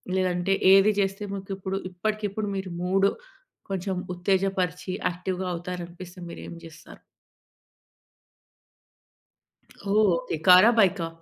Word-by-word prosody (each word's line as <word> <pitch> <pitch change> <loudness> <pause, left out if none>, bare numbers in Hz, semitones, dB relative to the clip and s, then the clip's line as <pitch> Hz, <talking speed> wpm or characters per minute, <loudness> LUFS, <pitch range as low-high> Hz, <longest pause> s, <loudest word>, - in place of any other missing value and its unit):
లేదంటే 185 0 +1 0.2
ఏది 195 +2 +6
చేస్తే 195 +1 -1
మీకు 195 0 -7
ఇప్పుడు 190 0 -3
ఇప్పటికిప్పుడు 210 +2 -3
మీరు 190 -1 -4
మూడు 195 +2 +3 0.6
కొంచెం 190 0 -2 0.2
ఉత్తేజపరిచి, 185 -1 -1 0.2
యాక్టివ్‍గా 180 +1 -4
అవుతారనిపిస్తే 175 +1 -7
మీరు - - -9
ఏం - - -8
చేస్తారు? 165 -2 -14 2.9
ఓహ్! 215 -2 +4
ఓకె. 165 -1 -4
కారా? 185 +5 +8
బైకా? 190 -5 +3
190 Hz, 100 wpm, -26 LUFS, 180-195 Hz, 2.9 s, కారా